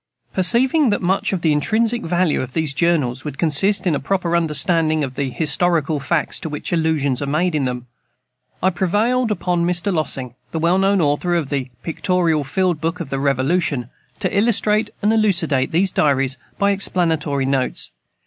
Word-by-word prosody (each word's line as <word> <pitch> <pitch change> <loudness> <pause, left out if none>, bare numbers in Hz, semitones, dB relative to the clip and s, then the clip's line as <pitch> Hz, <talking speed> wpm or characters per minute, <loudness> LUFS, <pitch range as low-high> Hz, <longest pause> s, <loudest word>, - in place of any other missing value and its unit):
Perceiving 250 - +3
that 205 - -1
much 190 +2 +1
of 190 -3 -2
the 160 - +2
intrinsic 225 +10 +1
value 175 -1 0
of 130 0 -6
these 160 -4 0
Journals 145 -5 0
would 145 -3 -6
consist 170 +7 +2
in 175 - +2
a 145 - 0
proper 175 +1 -1
understanding 155 -1 +1
of 130 -2 -4
the 135 0 -2
historical 155 +3 0
facts 150 +4 -1
to 165 - -5
which 150 +3 -4
allusions 155 -6 0
are 140 - -2
made 165 +5 0
in 145 -3 0
them, 125 -1 -4 0.8
I 190 - +3
prevailed 220 +8 +1
upon 180 -3 -1
Mr. 175 +3 0
LOSSING, 135 -6 -3 0.2
the - - -2
well 170 +3 +2
known 195 0 +2
author 155 +4 +1
of 160 -5 -1
the 135 -3 -2
"Pictorial 165 -2 0
Field 175 +2 -1
Book 165 +2 -2
of 160 -6 -6
the 135 - -1
Revolution" 140 -1 0 0.3
to - - -1
illustrate 215 0 +2
and 210 +2 +3
elucidate 175 -11 +1
these 185 +3 +2
diaries 135 -3 +1 0.2
by 200 0 +2
explanatory 160 -8 0
notes. 135 -1 -1
165 Hz, 175 wpm, -20 LUFS, 145-185 Hz, 0.8 s, Perceiving